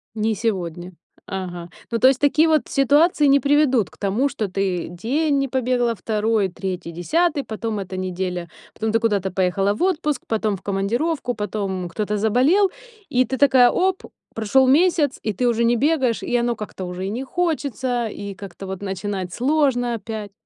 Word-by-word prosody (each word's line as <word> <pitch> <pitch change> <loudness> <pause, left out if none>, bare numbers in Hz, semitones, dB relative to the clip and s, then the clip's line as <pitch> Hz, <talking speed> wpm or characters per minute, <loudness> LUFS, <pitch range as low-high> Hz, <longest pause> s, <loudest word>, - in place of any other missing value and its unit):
Не 220 0 0
сегодня. 180 -5 -3 0.3
Ага. 175 -3 -5 0.2
Ну, 230 - +1
то 255 - +6
есть 265 -1 +2
такие 305 +3 +4
вот 310 -2 +3
ситуации 295 +3 +3
не 280 0 +6
приведут 280 - +2
к - - -20
тому, 210 +8 +1
что 215 -6 -3
ты 185 -2 -2
день 275 - 0
не 275 - +1
побегала, 245 -2 0
2-3-10, 210 - -1
потом 220 -1 -4
эта 185 -1 -5
неделя, 180 -1 -3 0.3
потом 220 0 -2
ты 225 - +3
куда-то 205 -4 0
поехала 190 +2 +1
в - - -5
отпуск, 300 -7 0
потом 215 -2 0
в 190 - -16
командировку, 240 +8 -1
потом 200 -4 -3
кто-то 210 +3 -2
заболел, 260 - +3 0.4
и 255 0 +2
ты 265 - -3
такая, 260 -3 +6
оп, 375 0 0 0.3
прошёл 225 +4 +3
месяц, 300 0 +3
и 215 - -1
ты 245 +6 -1
уже 235 -1 +2
не 235 +1 +3
бегаешь, 265 -4 +1
и 245 - 0
оно 235 -1 0
как-то 205 -3 -7
уже 180 +1 -5
и - - -3
не 245 +5 -3
хочется, 265 -7 -1
и 200 -1 -7
как-то 195 0 -9
вот 190 +1 -6
начинать 190 -2 -4
сложно 255 -3 +1
опять. 215 -1 -6
225 Hz, 170 wpm, -22 LUFS, 195-270 Hz, 0.4 s, то